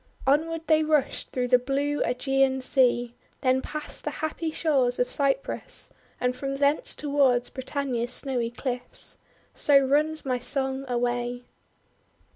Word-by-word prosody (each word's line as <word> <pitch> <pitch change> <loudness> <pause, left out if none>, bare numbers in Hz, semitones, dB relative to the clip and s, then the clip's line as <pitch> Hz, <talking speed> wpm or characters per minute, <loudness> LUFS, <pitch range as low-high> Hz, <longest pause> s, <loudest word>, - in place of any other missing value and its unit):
Onward 320 +4 +1
they 315 -1 +4
rushed 305 -3 +1
through 250 -1 -2
the 250 0 +6
blue 280 +3 -1
^Egean 265 +1 +1
Sea, 245 -2 +2 0.3
then 260 -1 +2
past 300 +2 -6
the - - -1 0.2
happy 320 +1 -3
shores 270 -6 +1
of 250 - 0
Cyprus, 275 -1 -1 0.3
and 250 0 0
from 275 +1 -3
thence 285 +2 +2
toward 275 -4 +2
Britannia's 260 -3 -2
snowy 245 -2 0
cliffs. 250 0 -5 0.3
So 285 -1 +5
runs 295 +3 +2
my 255 -2 0
song 265 +1 -1
away! 245 0 -1
270 Hz, 130 wpm, -26 LUFS, 250-285 Hz, 0.3 s, the